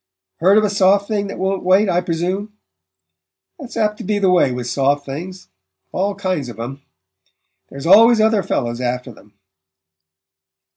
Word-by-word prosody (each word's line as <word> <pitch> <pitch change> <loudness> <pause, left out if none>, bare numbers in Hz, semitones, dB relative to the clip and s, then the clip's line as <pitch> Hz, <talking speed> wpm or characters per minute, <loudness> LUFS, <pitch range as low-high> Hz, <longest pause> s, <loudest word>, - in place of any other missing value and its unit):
Heard 190 +5 +4
of 215 - +4
a 210 - +1
soft 200 0 +3
thing 205 -2 -2
that 195 - -7
won't 190 +1 -2
wait, 190 +3 +3
I 180 -1 +1
presume? 180 +5 -3 1.1
That's 265 -6 -9
apt 210 -1 0
to - - -6
be 210 +2 -1
the 195 -2 +2
way 175 -7 +3
with 125 -1 -5
soft 140 +3 0
things 180 +7 -8 0.4
all 195 +2 -1
kinds 185 -9 -3
of 115 -1 -11
'em. 135 +4 -6 0.9
There's 140 +2 -9
always 225 +6 +6
other 220 -1 +3
fellows 120 -8 -3
after 125 +1 -3
them." 105 -2 -20
185 Hz, 160 wpm, -18 LUFS, 140-205 Hz, 1.1 s, always